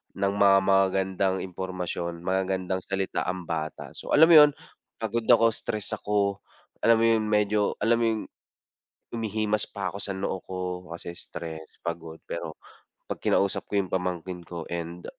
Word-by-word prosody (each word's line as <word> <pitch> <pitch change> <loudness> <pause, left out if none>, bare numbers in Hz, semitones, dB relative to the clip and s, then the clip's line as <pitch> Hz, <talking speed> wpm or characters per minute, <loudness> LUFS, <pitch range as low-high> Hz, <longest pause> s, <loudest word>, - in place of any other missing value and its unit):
ng 100 0 0
mga 100 -1 +6
magagandang 95 0 +2
impormasyon, 90 -2 -4
magagandang 95 0 0
salita 95 -1 -2
ang 90 0 -2
bata. 80 -1 -4
So, - - -5
alam 160 +3 +8
mo 170 - +9
yun 145 - 0 0.4
pagod 115 +1 -2
ako, 115 -2 +6
stress 105 -2 -3
ako. 100 -1 0 0.5
Alam 115 - +7
mo - - +4
yun 110 - -1
medyo 105 0 +2 0.2
alam 115 +1 +4
mo 120 - +2
yung, 110 -1 0 0.9
humihimas 110 -2 -1
pa 100 -2 -4
ako 100 - -7
sa 100 -1 -3
noo 95 0 -2
ko 95 - -5 0.4
kasi 85 - -7
stress, 80 -1 -7 0.2
pagod. 80 -1 -5
Pero - - -4 0.5
pag - - -6
kinausap 100 -1 +1
ko 100 - 0
yung 95 -2 0
pamangkin 90 -1 -2
ko 85 -1 -7
and 85 0 -5
95 Hz, 160 wpm, -27 LUFS, 90-105 Hz, 0.9 s, mo